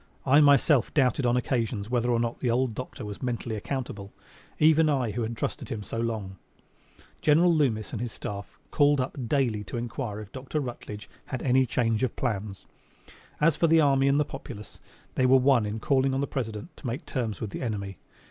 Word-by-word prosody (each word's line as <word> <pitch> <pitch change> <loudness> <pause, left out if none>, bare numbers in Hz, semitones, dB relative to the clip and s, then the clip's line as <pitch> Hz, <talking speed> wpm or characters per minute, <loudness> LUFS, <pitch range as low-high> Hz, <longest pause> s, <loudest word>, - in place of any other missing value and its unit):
I 145 +3 +6
myself 140 -3 +4
doubted 130 -2 +2
on 120 +1 +3
occasions 115 -4 -1
whether 120 -1 +1
or 120 -1 +2
not 115 0 -2
the 125 - 0
old 125 0 +1
doctor 130 0 -7
was 105 -1 -7
mentally 120 -2 -3
accountable 105 -4 -5 0.5
even 155 0 +5
I 130 -6 +1
who 120 - -3
had 115 0 -3
trusted - - -4
him 105 -3 -4
so 115 - -5
long. 110 -5 -3 0.8
General 165 +3 +5
Loomis 120 -9 +1
and 115 - -4
his 120 -2 -3
staff 100 -1 -7
called 145 -1 +4
up 130 +1 -2
daily 120 -6 +1
to 125 - -5
inquire 120 -2 -4
if 105 -2 -10
Dr. 135 +3 -4
Rutledge 120 -6 -6 0.2
had 130 - -5
any 130 0 +3
change 115 -2 0
of 130 -3 -1
plans. 105 -5 -3 0.7
As 150 0 +4
for 165 - +2
the 165 0 +5
army 135 -2 +4
and 140 +1 +3
the 150 - +2
populace, 120 -7 -9 0.3
they 130 - +2
were 130 +1 +7
one 130 -4 +3
in 105 +2 -4
calling 135 +2 +2
on - - 0
the 140 - +1
President 120 - -5
to 135 - -7
make 120 +4 -4
terms 115 -7 -3
with 105 - -4
the - - -5
enemy. 100 -6 -4
125 Hz, 200 wpm, -27 LUFS, 110-135 Hz, 0.8 s, were